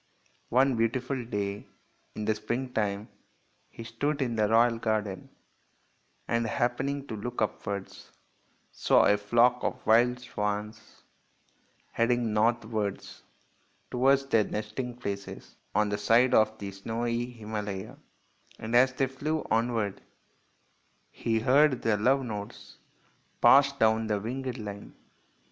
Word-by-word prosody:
One 130 Hz, +1 st, +3 dB
beautiful 125 Hz, +3 st, -1 dB
day 100 Hz, -2 st, -4 dB, 0.5 s
in 105 Hz, -, -4 dB
the 110 Hz, -, +2 dB
spring 120 Hz, +4 st, -4 dB
time 105 Hz, -1 st, -1 dB, 0.6 s
he 115 Hz, -, -10 dB
stood 140 Hz, +6 st, -2 dB
in 120 Hz, -4 st, -1 dB
the 110 Hz, -1 st, +2 dB
royal 115 Hz, +1 st, +3 dB
garden, 105 Hz, -4 st, -2 dB, 1.0 s
and 115 Hz, 0 st, 0 dB
happening 135 Hz, +3 st, -1 dB
to 115 Hz, -, -6 dB
look 120 Hz, +4 st, -5 dB
upwards 100 Hz, -2 st, -4 dB, 0.6 s
saw -, -, +3 dB
a 105 Hz, -, +5 dB
flock 120 Hz, +4 st, +2 dB
of -, -, -3 dB
wild 120 Hz, +3 st, +4 dB
swans 105 Hz, -2 st, -5 dB, 0.9 s
heading 115 Hz, -1 st, +1 dB
northwards 110 Hz, -2 st, -1 dB, 0.7 s
to 130 Hz, +2 st, +4 dB, 0.2 s
their 110 Hz, -2 st, +5 dB
nesting 110 Hz, +4 st, -5 dB
places 100 Hz, -5 st, -6 dB, 0.2 s
on 105 Hz, 0 st, +2 dB
the 105 Hz, 0 st, -2 dB
side 120 Hz, +5 st, +4 dB
of 110 Hz, -1 st, +3 dB
the 100 Hz, -1 st, -6 dB
snowy 115 Hz, +4 st, -3 dB
Hima 105 Hz, -1 st, -4 dB
laya, 105 Hz, +5 st, -6 dB, 0.6 s
and 110 Hz, +2 st, -3 dB
as 130 Hz, +1 st, +5 dB
they 135 Hz, -, +1 dB
flew 150 Hz, +4 st, -3 dB
onward 115 Hz, -3 st, 0 dB, 1.1 s
he 115 Hz, -1 st, -1 dB
heard 135 Hz, +1 st, +3 dB
the 110 Hz, -2 st, +2 dB
love 130 Hz, +6 st, +2 dB
notes 105 Hz, -3 st, -8 dB, 0.6 s
pass 140 Hz, 0 st, +6 dB
down 110 Hz, -4 st, +2 dB
the 105 Hz, -1 st, 0 dB
winged 130 Hz, +4 st, -4 dB
line. 100 Hz, -2 st, -8 dB
115 Hz, 125 wpm, -28 LUFS, 105-125 Hz, 1.1 s, pass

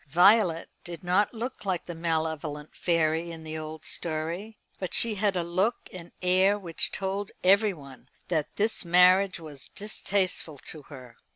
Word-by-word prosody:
Violet 175 Hz, +2 st, +4 dB
did 175 Hz, -1 st, -8 dB
not 185 Hz, +4 st, +2 dB
look 240 Hz, +1 st, -5 dB
like 185 Hz, -4 st, -2 dB
the 175 Hz, -, -6 dB
malevolent 160 Hz, -2 st, -3 dB
fairy 165 Hz, -1 st, +1 dB
in 165 Hz, -1 st, -8 dB
the 155 Hz, 0 st, -6 dB
old 155 Hz, 0 st, -6 dB
story, 170 Hz, +6 st, -3 dB, 0.2 s
but 185 Hz, -, -3 dB
she 230 Hz, -2 st, +3 dB
had 205 Hz, -1 st, +1 dB
a 175 Hz, -, 0 dB
look 185 Hz, +7 st, 0 dB
and 175 Hz, -2 st, -9 dB
air 185 Hz, +3 st, +4 dB
which 170 Hz, -5 st, -2 dB
told 195 Hz, +1 st, -3 dB
everyone 180 Hz, -, +1 dB, 0.2 s
that 160 Hz, -4 st, -1 dB
this 215 Hz, +2 st, +1 dB
marriage 180 Hz, +2 st, +5 dB
was 150 Hz, -4 st, -9 dB
distasteful 195 Hz, -6 st, -1 dB
to 155 Hz, +2 st, -7 dB
her. 130 Hz, -5 st, -12 dB
175 Hz, 155 wpm, -28 LUFS, 160-195 Hz, 0.2 s, marriage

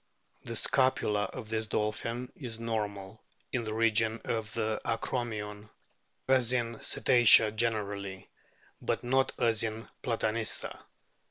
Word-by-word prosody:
The 115 Hz, -, -4 dB
scapula 110 Hz, -5 st, +2 dB
of 110 Hz, +2 st, -8 dB
this 110 Hz, 0 st, -1 dB
dolphin 115 Hz, +4 st, -2 dB
is 120 Hz, -5 st, -6 dB
normal 105 Hz, -3 st, -4 dB, 0.3 s
in 120 Hz, -3 st, -1 dB
the 110 Hz, -, -3 dB
origin 110 Hz, 0 st, +2 dB
of 110 Hz, -2 st, -2 dB
the 110 Hz, -1 st, -1 dB
acromion, 105 Hz, -3 st, -3 dB, 0.6 s
as 130 Hz, -2 st, +4 dB
in 115 Hz, -2 st, -1 dB
Cetacea 115 Hz, -3 st, +6 dB
generally, 100 Hz, -4 st, -2 dB, 0.5 s
but -, -, -1 dB
not 130 Hz, +2 st, +2 dB
as 115 Hz, -2 st, +2 dB
in 110 Hz, 0 st, -3 dB
Platanista. 115 Hz, -2 st, -2 dB
110 Hz, 115 wpm, -30 LUFS, 105-120 Hz, 0.6 s, Cetacea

